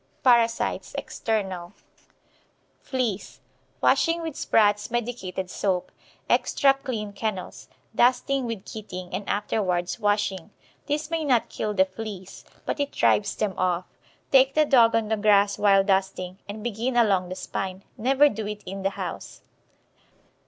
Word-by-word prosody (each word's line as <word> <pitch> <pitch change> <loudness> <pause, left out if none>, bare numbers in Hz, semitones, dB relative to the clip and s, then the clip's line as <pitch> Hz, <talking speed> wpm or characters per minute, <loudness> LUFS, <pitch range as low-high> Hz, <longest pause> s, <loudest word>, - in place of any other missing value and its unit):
PARASITES. 235 -3 +2
EXTERNAL. 190 -5 -3 1.1
FLEAS. 245 -7 -3 0.4
Washing 335 0 +3
with 320 -4 -4
Spratts' 210 -1 +2
medicated 225 -6 -3
soap. 185 -1 -1 0.4
Extra 275 -1 +3
clean 235 -7 -5
kennels. 200 -3 -5 0.2
Dusting 250 +2 +2
with 225 -4 -5
Keating, 185 -4 -8
and 205 - -4
afterwards 190 -4 -1
washing. 205 -4 0 0.4
This 300 +1 -2
may 330 -1 0
not 255 -6 +2
kill 210 -1 -3
the 190 -1 +5
fleas, 190 -1 -8 0.2
but - - -2
it 285 0 -1
drives 200 -1 +2
them 210 -3 -1
off. 185 -1 +1 0.5
Take 270 0 +5
the 305 0 +5
dog 235 -5 +5
on 225 -2 0
the 220 - +1
grass 205 -1 +3
while 195 -1 +5
dusting, 190 -1 -1
and 210 +1 -6
begin 240 +2 -2
along 195 -6 +3
the 185 - -5
spine. 190 0 -5
Never 270 +5 +4
do 215 -5 -3
it 210 0 -6
in 195 +1 -6
the 195 - +1
house. - - -6
210 Hz, 140 wpm, -25 LUFS, 195-245 Hz, 1.1 s, the